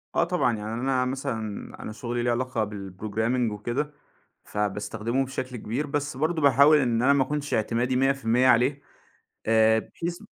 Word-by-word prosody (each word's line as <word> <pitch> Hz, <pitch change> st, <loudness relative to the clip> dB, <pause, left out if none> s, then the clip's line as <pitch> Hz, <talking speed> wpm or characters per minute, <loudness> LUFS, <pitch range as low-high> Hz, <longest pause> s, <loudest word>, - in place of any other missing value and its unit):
آه -, -, +4 dB
طبعًا، 170 Hz, -10 st, +1 dB
يعني 105 Hz, +1 st, -5 dB
أنا 130 Hz, +2 st, 0 dB
مثلًا 130 Hz, -2 st, -3 dB, 0.4 s
أنا -, -, -5 dB
شُغلي 120 Hz, +2 st, -3 dB
ليه 120 Hz, -, +2 dB
علاقة 120 Hz, -2 st, -1 dB
بالprogramming 110 Hz, +4 st, -2 dB
وكده، 120 Hz, +8 st, -3 dB, 0.5 s
فباستخدمه 110 Hz, +5 st, -2 dB
بشكل 130 Hz, -1 st, -5 dB
كبير، 120 Hz, +7 st, -3 dB
بس 145 Hz, -1 st, -2 dB
برضه 160 Hz, +3 st, 0 dB
باحاول 140 Hz, +2 st, +6 dB
إن 120 Hz, -5 st, +1 dB
أنا 135 Hz, +3 st, +5 dB
ما 140 Hz, -1 st, +3 dB
أكونش 145 Hz, +2 st, -3 dB
اعتمادي 120 Hz, +3 st, 0 dB
100% 130 Hz, -2 st, +2 dB
عليه، 130 Hz, +4 st, +3 dB, 0.7 s
آآ 110 Hz, 0 st, +4 dB
بحيث 170 Hz, +8 st, -5 dB
125 Hz, 150 wpm, -26 LUFS, 110-140 Hz, 0.7 s, باحاول